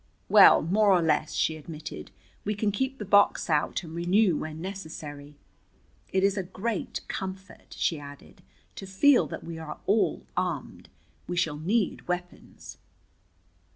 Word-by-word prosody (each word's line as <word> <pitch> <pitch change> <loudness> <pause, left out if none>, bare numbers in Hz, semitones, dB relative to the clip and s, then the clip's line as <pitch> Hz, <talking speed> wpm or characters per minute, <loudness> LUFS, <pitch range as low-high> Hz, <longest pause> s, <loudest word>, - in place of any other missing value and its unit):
"Well, - - +8
more 205 +6 +3
or 180 -3 +4
less," 155 -1 +1
she 160 - +1
admitted. 155 0 -8 0.3
"We 210 +1 -2
can 205 0 0
keep 265 +6 -2
the 210 - -6
box 200 -3 +3
out 150 +4 0
and 160 -1 -9
renew 175 +2 +2
when 155 +1 -5
necessary. 160 -6 -8 0.8
It 190 0 +1
is 200 +1 +2
a - - +1
great 195 +3 -4
comfort," 190 0 -7
she 165 - 0
added, 145 0 -13 0.4
"to 195 - -7
feel 245 +9 +4
that - - -7
we 165 -1 -7
are 150 -2 -7
all 210 +2 +1
armed. - - -3 0.4
We 175 - -4
shall 155 -4 0
need 200 +6 -1
weapons." 180 0 -6
180 Hz, 150 wpm, -27 LUFS, 160-200 Hz, 0.8 s, Well